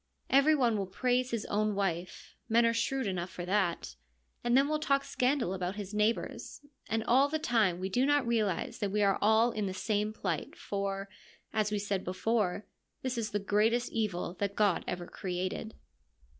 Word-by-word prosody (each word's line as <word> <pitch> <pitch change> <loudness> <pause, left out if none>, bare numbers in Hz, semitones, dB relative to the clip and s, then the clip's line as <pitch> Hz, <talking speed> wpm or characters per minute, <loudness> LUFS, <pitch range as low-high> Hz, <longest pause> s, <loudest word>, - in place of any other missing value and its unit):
Every 280 +3 +6
one 235 -6 +2
will 195 - -2
praise 250 +5 0
his 230 -3 -2
own 210 0 0
wife 180 -3 -3
— - - -44
men 230 +1 +5
are 230 - +3
shrewd 260 +3 0
enough 185 -2 -2
for 175 - -6
that 185 -2 0 0.2
— 60 +1 -43
and 240 +1 +3
then 275 +1 +4
will 305 0 0
talk 275 -2 +2
scandal 255 -8 0
about 185 0 -3
his 205 -1 -6
neighbour's, 215 +6 -1 0.3
and 225 0 0
all 265 +5 +4
the 315 - 0
time 220 - +1
we 185 - -2
do 245 +7 +1
not 290 -1 +3
realise 220 -6 0
that 205 - -1
we 210 +1 +2
are 195 -1 +3
all 220 +3 +4
in 215 -3 -2
the 185 - -4
same 210 +1 0
plight, 215 - -3
for, 195 0 -3 0.5
as 215 -1 +1
we 210 - 0
said 200 -2 -2
before, 200 +2 0 0.4
this 260 -1 -1
is 225 -2 -2
the 210 - -1
greatest 215 +4 +1
evil 195 -6 -2
that 200 0 -1
God 205 -5 +2
ever 175 -1 -3
created. 185 +4 -4
210 Hz, 195 wpm, -31 LUFS, 195-235 Hz, 0.5 s, Every